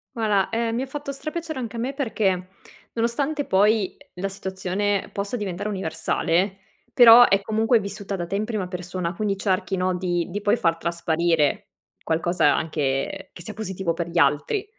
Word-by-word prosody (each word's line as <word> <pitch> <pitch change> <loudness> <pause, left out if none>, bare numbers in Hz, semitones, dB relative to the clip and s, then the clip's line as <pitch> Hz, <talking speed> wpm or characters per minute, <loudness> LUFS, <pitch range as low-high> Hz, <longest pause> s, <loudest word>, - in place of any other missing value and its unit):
Guarda 210 -4 +1
ehm, 230 0 -1
mi 245 - -1
ha - - -3
fatto 285 0 -5
stra 275 +3 -5
piacere 320 -3 -5
anche 235 -1 -5
a - - -4
me 260 +4 -2
perché 195 -9 -1 0.5
nonostante 275 +6 -1
poi 205 +1 +2 0.2
la 190 +2 -3
situazione 190 +1 -2
possa 200 +4 -3
diventare 205 -2 -3
universale 190 0 -1 0.3
però 240 -1 +9
è 195 0 +3
comunque 220 +3 +2
vissuta 200 0 -5
da 175 -2 -3
te 195 - -4
in 210 +2 0
prima 215 -5 -3
persona 180 -1 -4
quindi 200 0 -1
cerchi 190 -1 0
no 185 0 0
di 175 -2 -1
di 200 +3 -3
poi 205 +2 +3
far 165 -7 +1
trasparire 170 -2 0 0.3
qualcosa 165 -1 +2
anche 155 +5 -2
che - - -11
sia 215 - -7
positivo 190 -5 -2
per 170 0 -3
gli 170 - -5
altri. 150 - +2
195 Hz, 175 wpm, -24 LUFS, 175-225 Hz, 0.5 s, però